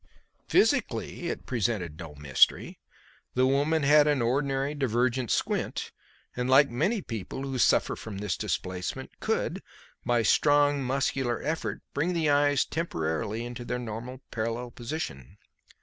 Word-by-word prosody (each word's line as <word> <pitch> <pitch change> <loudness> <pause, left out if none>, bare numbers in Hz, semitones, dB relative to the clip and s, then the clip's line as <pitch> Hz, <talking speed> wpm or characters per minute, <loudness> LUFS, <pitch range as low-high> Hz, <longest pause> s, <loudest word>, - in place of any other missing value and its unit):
Physically - - +1
it - - -5
presented 100 -9 -2
no 80 -4 -8
mystery. 70 -3 +2 0.6
The 130 +1 +4
woman 145 +4 +2
had 150 +1 +6
an 145 -2 +2
ordinary 135 +3 0
divergent 125 -3 0
squint, - - -1 0.4
and, 125 +1 -2
like 140 +1 +6
many 185 - 0
people, 115 +3 -5
who 135 -2 -3
suffer - - +3
from 110 -3 -8
this 100 -3 -2
displacement, 90 -1 -3
could, - - -1 0.4
by 120 -1 +2
a - - -2
strong 145 -1 +4
muscular 130 -2 0
effort, 160 +3 -3
bring 165 +6 0
the 160 -3 +2
eyes 145 -1 +3
temporarily 110 - -2
into 120 0 -6
their 125 +1 -3
normal 120 +2 -6
parallel 115 +2 -3
position. 115 - -6
125 Hz, 135 wpm, -28 LUFS, 115-145 Hz, 0.6 s, had